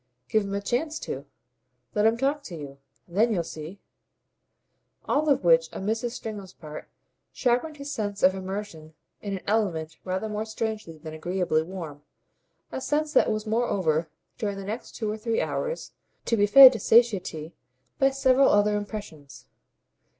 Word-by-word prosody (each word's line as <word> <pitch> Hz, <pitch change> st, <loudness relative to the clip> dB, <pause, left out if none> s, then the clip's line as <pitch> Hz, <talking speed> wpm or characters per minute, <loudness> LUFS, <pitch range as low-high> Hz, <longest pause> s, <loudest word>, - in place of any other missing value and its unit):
"Give 215 Hz, -1 st, +2 dB
him 200 Hz, 0 st, -3 dB
a 200 Hz, -, -2 dB
chance 300 Hz, +9 st, -1 dB
to. 140 Hz, +2 st, -5 dB, 0.7 s
Let 210 Hz, +1 st, +3 dB
him 225 Hz, +1 st, +2 dB
talk 280 Hz, +4 st, 0 dB
to 180 Hz, -, -7 dB
you. 140 Hz, -3 st, -9 dB, 0.3 s
Then 210 Hz, +7 st, +2 dB
you'll 180 Hz, -6 st, +1 dB
see." 160 Hz, +4 st, -8 dB, 1.3 s
All 300 Hz, +2 st, +2 dB
of 275 Hz, -, +3 dB
which, 165 Hz, -1 st, +4 dB
on 190 Hz, -, -5 dB
Mrs. 225 Hz, +3 st, 0 dB
Stringham's 210 Hz, -6 st, -7 dB
part, 155 Hz, -1 st, -9 dB, 0.4 s
sharpened 255 Hz, +5 st, 0 dB
his 280 Hz, 0 st, -6 dB
sense 205 Hz, -2 st, -3 dB
of 185 Hz, -, +6 dB
immersion 190 Hz, -5 st, -6 dB, 0.3 s
in 200 Hz, -2 st, -3 dB
an -, -, -12 dB
element 170 Hz, -7 st, -1 dB
rather 190 Hz, +3 st, -2 dB
more 210 Hz, 0 st, -3 dB
strangely 220 Hz, -6 st, -4 dB
than 155 Hz, 0 st, -9 dB
agreeably 175 Hz, 0 st, 0 dB
warm 160 Hz, -4 st, -7 dB, 0.7 s
a -, -, -4 dB
sense 300 Hz, +2 st, 0 dB
that -, -, +4 dB
was 215 Hz, 0 st, -2 dB
moreover, 190 Hz, -9 st, 0 dB, 0.3 s
during 205 Hz, -4 st, -2 dB
the 195 Hz, -, -6 dB
next 220 Hz, +5 st, -6 dB
two 220 Hz, -, -3 dB
or 215 Hz, -, -5 dB
three 230 Hz, +1 st, 0 dB
hours, -, -, -3 dB, 0.3 s
to 230 Hz, -, +2 dB
be 205 Hz, -1 st, +3 dB
fed 265 Hz, +3 st, +10 dB
to -, -, -4 dB
satiety 190 Hz, -9 st, +2 dB, 0.5 s
by 270 Hz, -, +5 dB
several 270 Hz, 0 st, +4 dB
other 205 Hz, 0 st, +3 dB
impressions. 205 Hz, -9 st, -7 dB
205 Hz, 165 wpm, -26 LUFS, 170-235 Hz, 1.3 s, fed